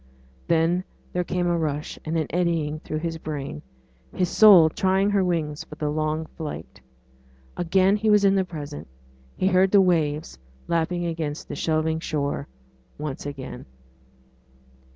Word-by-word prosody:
Then 170 +2 +2 0.3
there 180 - 0
came 180 0 -1
a 175 0 +2
rush 150 -2 -3
and 160 +1 -2
an 160 - 0
eddying 165 -3 0
through 155 - -5
his 165 0 -3
brain 150 -1 -5 0.5
his 180 -2 +1
soul 195 -7 +8
trying 190 +4 +1
her 200 -2 +3
wings 160 -4 -1
for - - -11
the 150 -1 -2
long 155 +1 -1
flight. 150 - -8 0.7
Again 185 +3 +3
he 215 +1 0
was 210 -1 +5
in 195 - +5
the 195 -1 +2
present: 150 -5 -7 0.5
he - - 0
heard 190 0 +4
the 200 - +5
waves 155 - +1 0.3
lapping 170 +1 0
against 160 -3 -4
the - - -4
shelving 160 0 0
shore 145 -3 -2 0.5
once 145 -1 -5
again. 135 - -7
165 Hz, 150 wpm, -24 LUFS, 150-180 Hz, 0.7 s, soul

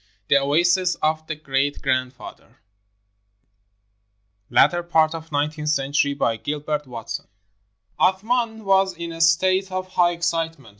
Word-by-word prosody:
THE 140 - +6
OASIS 175 +6 +2
OF 155 0 -1
THE 155 - -3
GREAT 145 -1 -1
GRANDFATHER 130 0 -4 1.9
[Latter 175 0 +4
part 160 -2 +2
of 165 -1 -8
nineteenth 150 +1 -1
century] 140 -1 +1
BY 115 -5 0
GILBERT 150 +4 -3
WATSON 115 -2 -7 0.7
Athman 220 +4 +1
was 195 -1 +3
in 170 0 -6
a 165 0 -6
state 185 +4 +3
of 185 0 -4
high 175 -1 +2
excitement. 165 -6 -3
160 Hz, 120 wpm, -22 LUFS, 145-180 Hz, 1.9 s, THE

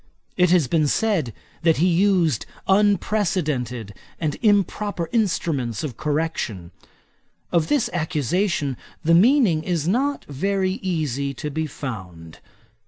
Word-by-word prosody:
It 180 -1 +3
has 175 -6 +4
been 155 +1 +2
said, 185 - +1 0.3
that 165 -2 +3
he 170 - +3
used 180 - +2 0.2
unprecedented 170 - +1 0.3
and 155 -3 -1
improper 205 -3 +1
instruments 160 - 0
of 140 -7 -4
correction. 145 - -2 0.8
Of 165 -2 +2
this 270 -5 +2
accusation 160 - -1 0.3
the 165 +1 +3
meaning 205 - +5
is 165 -2 -2
not 275 +9 0
very 190 +6 -1
easy 140 -7 -2
to 150 +2 -5
be 160 +2 -2
found. 90 - -8
165 Hz, 115 wpm, -23 LUFS, 140-195 Hz, 0.8 s, meaning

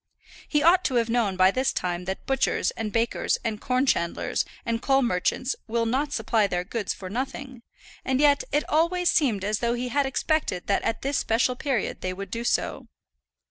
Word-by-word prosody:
He 295 -1 +1
ought 360 +3 +5
to 260 - 0
have 230 -1 +1
known 225 -5 +1
by 185 +1 +5
this 260 +5 +1
time 180 0 -3
that 190 +1 -5
butchers, 270 0 +1
and 215 -2 -4
bakers, 230 +2 0
and 215 -2 -3
corn 255 +1 +1
chandlers, 170 -10 0 0.2
and 230 -1 -1
coal 270 0 +3
merchants 240 +5 0
will 230 0 0
not 270 +6 0
supply 225 -4 +1
their 180 -2 -1
goods 210 +1 -3
for 190 - -7
nothing; 260 +3 -5 0.4
and 260 0 0
yet 285 -1 +4
it 295 +1 0
always 340 +3 +2
seemed 225 -10 +1
as 210 +1 0
though 235 0 0
he 250 +1 -3
had 280 +2 +1
expected 270 - -1
that 200 - +1
at 225 - -2
this 275 +1 0
special 240 +3 +1
period 260 -4 -2
they 185 0 -2
would 195 0 -7
do 230 0 -3
so. 240 - -1
235 Hz, 195 wpm, -25 LUFS, 205-270 Hz, 0.4 s, ought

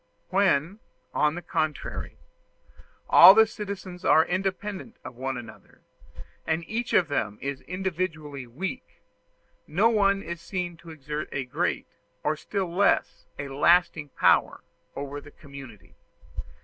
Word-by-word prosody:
When, 190 -1 +2 0.3
on 150 +1 +2
the 175 - -6
contrary, 155 -3 -3 0.9
all 185 +3 +10
the 220 0 +7
citizens 195 -4 -7
are 160 - +5
independent 195 +5 -3
of - - -7
one 130 +1 -3
another, 120 - -12 0.7
and 160 +1 -1
each 235 +2 -3
of 175 - +4
them 105 -8 -2
is 140 -1 -4
individually 165 -7 -4
weak, 190 - -7 0.6
no 200 +9 +3
one 200 -3 +2
is 170 0 -6
seen 175 0 -4
to 170 0 -14
exert 150 -1 -6
a 135 - -3
great, 125 - -1 0.4
or 150 - +1
still 185 +2 -4
less 200 +2 +1
a 140 0 -5
lasting 150 +1 +3
power, - - +3 0.3
over 140 +1 -5
the 145 - -13
community. 140 -7 -13
170 Hz, 130 wpm, -26 LUFS, 145-190 Hz, 0.9 s, all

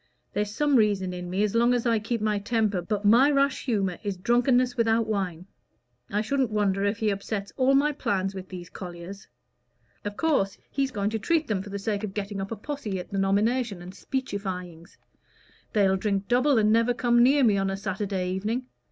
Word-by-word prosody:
There's 205 0 -1
some 290 +5 +2
reason 200 -4 +1
in 180 0 -6
me 190 +3 0
as 210 - 0
long 235 +2 +3
as 245 - -1
I 230 -2 +3
keep 225 +1 -3
my 210 -1 +1
temper, 210 -3 0
but 205 +3 -3
my 240 +7 +6
rash 280 -1 +1
humor 195 -8 0
is 200 -3 -3
drunkenness 245 +4 +2
without 225 -1 +2
wine. 185 -5 -3 0.6
I 210 - 0
shouldn't 260 +2 0
wonder 200 -2 +1
if 205 +1 0
he 220 -2 +1
upsets 200 0 -4
all 270 +1 +3
my 290 +2 +3
plans 195 -8 -1
with 190 -1 -8
these 180 -2 -8
colliers. 180 +2 -9 0.8
Of 205 0 -5
course 275 -12 +1
he's 275 -1 0
going 205 -4 -2
to 225 - -2
treat 320 +8 +1
them 205 -4 -1
for 205 - -9
the 200 - -4
sake 205 +1 -2
of 195 -2 -5
getting 200 -1 -3
up 195 - -5
a - - -2
posse 225 -4 -4
at 180 - -9
the 195 - -1
nomination 205 +2 +1
and 180 +1 -9
speechifyings. 185 -9 -5 0.8
They'll 195 -2 +3
drink 200 0 -1
double, 255 +2 +3
and 215 -1 +4
never 230 +2 +3
come 240 0 +3
near 275 +3 +5
me 215 -4 +4
on 195 0 0
a 195 - -2
Saturday 195 -2 -2
evening. 215 +7 -2
210 Hz, 205 wpm, -26 LUFS, 195-240 Hz, 0.8 s, my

